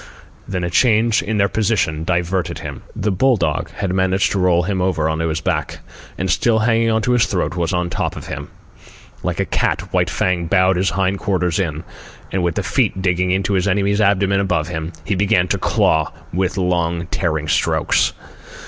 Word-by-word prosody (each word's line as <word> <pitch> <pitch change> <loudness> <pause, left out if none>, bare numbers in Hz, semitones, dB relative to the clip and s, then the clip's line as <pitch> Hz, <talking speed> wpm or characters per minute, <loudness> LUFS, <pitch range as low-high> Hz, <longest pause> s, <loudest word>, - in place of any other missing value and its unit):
Then 90 -2 -3
a 85 - -2
change 115 +2 +3
in 110 0 -2
their 100 -1 +3
position 100 -6 0
diverted 90 +1 -1
him. - - -7
The 105 - -1
bull 125 +6 +3
dog 75 -5 -1
had 95 -2 -3
managed 95 0 +1
to 100 - 0
roll 90 -1 +3
him 95 0 -1
over 90 -4 +1
on 80 0 -1
his 80 -1 -1
back, - - -2 0.4
and 95 - -2
still 110 +6 +2
hanging 115 +1 +2
on 110 -1 +1
to 125 - +1
his 120 -2 +3
throat, 90 -2 -1
was 85 -3 -1
on 90 -1 -1
top - - -2
of - - -8
him. - - -6 0.7
Like - - -3
a - - +1
cat, - - -1
White - - +2
Fang 90 -2 0
bowed 95 0 +3
his 95 +1 +1
hind 95 0 0
quarters 90 -3 0
in, 80 -4 -2 0.5
and, 95 - 0
with 85 -2 0
the - - -1
feet - - 0
digging 90 -1 +1
into 95 +2 0
his 95 0 +1
enemy's 100 +2 +1
abdomen 100 -1 +2
above 90 -5 0
him, 80 -1 -4
he 105 - 0
began 95 -2 +2
to - - 0
claw 80 -2 +1 0.2
with 90 +2 -1
long 85 -2 0
tearing 80 -4 -1
strokes. - - +1
95 Hz, 195 wpm, -19 LUFS, 85-100 Hz, 0.7 s, change